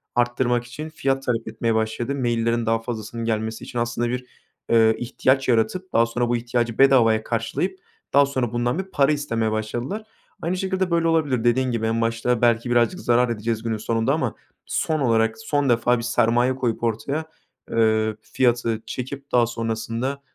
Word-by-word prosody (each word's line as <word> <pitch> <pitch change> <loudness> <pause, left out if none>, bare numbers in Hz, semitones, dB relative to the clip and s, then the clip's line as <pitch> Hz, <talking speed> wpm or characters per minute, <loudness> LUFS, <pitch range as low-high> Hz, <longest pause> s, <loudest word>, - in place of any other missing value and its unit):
arttırmak 120 0 +1
için 150 +6 -7
fiyat 135 -4 -1
talep 115 -3 -1
etmeye 110 +1 -1
başladı. 110 +4 -1
Maillerin 115 -2 0
daha 115 0 +2
fazlasının 115 0 -5
gelmesi 110 0 -2
için 120 - -5
aslında 120 0 -1
bir, 125 +1 -3 0.4
eee, 110 -1 +5
ihtiyaç 130 +2 +1
yaratıp 130 +11 0
daha 115 - +5
sonra 120 +1 -1
bu 120 - +2
ihtiyacı 120 -1 -2
bedavaya 120 -5 +5
karşılayıp 120 +12 -2 0.3
daha 140 +1 +6
sonra 130 -4 -2
bundan 120 +6 0
bir - - -1
para 150 -6 +2
istemeye 115 -7 -1
başladılar. 120 - -3 0.4
Aynı 175 +3 -1
şekilde 190 -1 -1
böyle 165 0 +2
olabilir. 150 -8 +1
Dediğin 125 +2 +2
gibi 115 -2 -1
en 115 +1 0
başta 115 +1 0
belki 120 0 +2
birazcık 120 +9 +2
zarar 120 -3 +2
edeceğiz 110 0 -2
günün 115 -1 -1
sonunda 115 +4 0
ama 130 -7 -1 0.3
son 155 -1 -1
olarak 115 -4 +2
son 145 -10 0
defa 120 +1 +3
bir 115 - -5
sermaye 120 +1 +2
koyup 120 -3 -2
ortaya, 135 +7 -1 0.5
eee, 110 -1 +2
fiyatı 120 -2 0
çekip 135 +2 -6
daha 120 -1 +4
sonrasında, 115 +4 -3
120 Hz, 170 wpm, -23 LUFS, 115-135 Hz, 0.5 s, daha